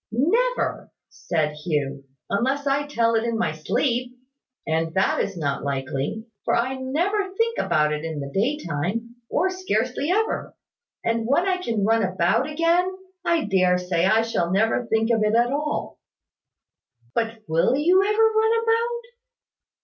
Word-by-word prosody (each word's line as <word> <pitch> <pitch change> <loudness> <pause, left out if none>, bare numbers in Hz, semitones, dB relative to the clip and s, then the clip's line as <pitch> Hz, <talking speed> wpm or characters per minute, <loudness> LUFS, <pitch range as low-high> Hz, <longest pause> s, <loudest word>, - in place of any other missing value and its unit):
"Never," 450 - 0 0.2
said 155 -3 -1
Hugh, 140 -4 -2 0.2
"unless 265 +7 0
I 280 +1 +1
tell 230 -5 +1
it 225 0 +2
in 230 -1 -1
my 225 -8 0
sleep; 245 - -1 0.5
and 160 0 -1
that 190 - +2
is 200 -2 -2
not 140 -4 -2
likely, 140 +8 -3 0.2
for - - +1
I 245 +3 0
never 350 +10 -1
think 460 0 +1
about 155 -5 +2
it 150 0 -4
in 160 -2 -4
the 140 -1 -5
daytime, 230 - -2
or 370 +4 +1
scarcely 275 - -1
ever; 435 +4 0 0.5
and 230 -1 0
when 335 +8 +2
I 370 -1 +2
can 230 - -1
run 225 +1 +3
about 185 - +1
again, 335 +4 +2 0.3
I 340 -5 +1
dare 185 -3 +3
say 180 -1 0
I 220 +3 +4
shall 175 -7 -1
never 225 +4 +1
think 225 +1 +1
of 225 -2 +2
it 215 +1 +2
at 240 +2 +3
all." 300 +1 -3 1.1
"But 225 -1 -2
will 165 +10 +2
you 355 +7 +4
ever 425 +2 +2
run 445 +1 +3
about?" 470 +1 0
230 Hz, 155 wpm, -24 LUFS, -, 1.1 s, I